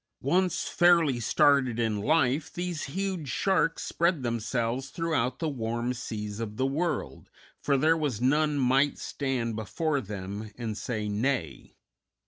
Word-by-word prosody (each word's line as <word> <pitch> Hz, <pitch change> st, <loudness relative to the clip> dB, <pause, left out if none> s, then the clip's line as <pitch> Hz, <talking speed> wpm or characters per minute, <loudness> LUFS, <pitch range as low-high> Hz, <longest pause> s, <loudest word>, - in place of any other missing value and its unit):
Once 180 Hz, +6 st, +1 dB
fairly 170 Hz, -7 st, +4 dB
started 130 Hz, +1 st, +3 dB
in 110 Hz, -3 st, 0 dB
life, 140 Hz, +3 st, +2 dB
these 175 Hz, -2 st, -3 dB
huge 185 Hz, -1 st, -3 dB
sharks 175 Hz, +5 st, +1 dB
spread 170 Hz, -4 st, 0 dB
themselves 120 Hz, +2 st, -1 dB
throughout 155 Hz, -7 st, -1 dB
the 165 Hz, -, -2 dB
warm 120 Hz, -2 st, -2 dB
seas 105 Hz, -3 st, -5 dB
of 110 Hz, -2 st, -5 dB
the 130 Hz, -, +1 dB
world, 155 Hz, +6 st, -2 dB, 0.3 s
for 140 Hz, -1 st, +2 dB
there 155 Hz, +4 st, +4 dB
was 145 Hz, -9 st, -1 dB
none 150 Hz, +4 st, +2 dB
might 135 Hz, +2 st, +3 dB
stand 125 Hz, -5 st, -2 dB
before 140 Hz, -, -1 dB
them 100 Hz, 0 st, -6 dB
and 115 Hz, -3 st, -4 dB
say 105 Hz, 0 st, -3 dB
nay. 105 Hz, -, -2 dB
130 Hz, 135 wpm, -28 LUFS, 115-155 Hz, 0.3 s, fairly